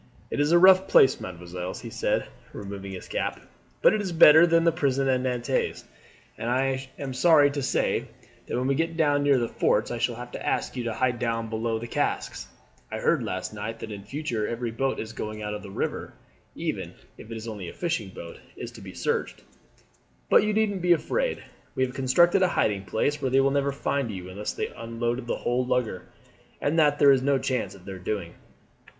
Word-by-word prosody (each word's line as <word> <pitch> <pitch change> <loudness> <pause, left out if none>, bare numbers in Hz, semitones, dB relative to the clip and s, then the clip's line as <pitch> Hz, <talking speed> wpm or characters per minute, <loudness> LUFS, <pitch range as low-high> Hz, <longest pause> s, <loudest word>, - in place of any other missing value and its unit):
"It - - -2
is 145 +2 +2
a 175 - +7
rough 185 +1 +7
place, 130 - +5
mesdemoiselles," 90 0 -6
he - - -8
said, - - 0 0.3
removing 100 -1 -7
his 90 - -8
cap, - - -2 0.4
"but - - +7
it 215 - 0
is 190 -3 -3
better 160 0 +8
than 165 0 +4
the 170 - +4
prisons 140 -4 0
at 130 -1 +2
Nantes. 125 0 -1 0.5
I 130 +3 -1
am 135 -2 -5
sorry 145 +1 +5
to 140 0 -3
say 130 - 0 0.4
that - - -2
when 125 - -1
we 135 - +2
get 165 +3 -1
down 145 -3 +3
near 145 -1 +4
the 120 -2 0
forts 105 -1 +1
I 120 - -3
shall 120 0 0
have 120 +1 -8
to - - -7
ask - - -1
you 125 -2 -3
to 115 - -1
hide 125 -2 0
down 115 -2 -2
below 115 0 -1
the 115 - -6
casks. 120 - -2 0.4
I - - -3
heard - - +2
last - - -4
night 110 +2 -5
that 110 - -7
in 100 -1 -7
future 125 -5 -3
every 120 0 -3
boat 135 +4 -1 0.2
going 110 0 -5
out 105 0 -3
of 105 - -5
the 100 - -10
river, 95 - -4 0.4
even - - -4 0.2
if 110 - -11
it 115 - -5
is 110 +1 -7
only 100 -6 -6
a - - -10
fishing 160 - -2
boat, 85 -2 -10 0.2
is - - -6
to - - -12
be - - -10
searched. - - -2 0.9
But - - +7
you 215 +1 0
needn't 210 -3 0
be 175 0 +5
afraid; - - -1 0.3
we 130 - +2
have 125 - -7
constructed 170 +8 +3
a 185 - +5
hiding 100 - 0
place, 145 +8 -1
where 135 - 0
they 135 +1 +3
will 135 0 +3
never 140 0 +1
find 140 -2 -1
you 95 -3 -6
unless 105 +3 -4
they - - -3
unloaded 120 +2 -4
the - - -1
whole 125 +1 0
lugger, 120 -7 -1 0.5
and 155 +3 +1
that 145 -2 +4
there 140 -1 +7
is 135 -2 +4
no 140 +1 +2
chance 130 -6 -2
of 90 -2 -16
their 95 -1 -7
doing." 90 -2 -4
125 Hz, 215 wpm, -26 LUFS, 110-145 Hz, 0.9 s, better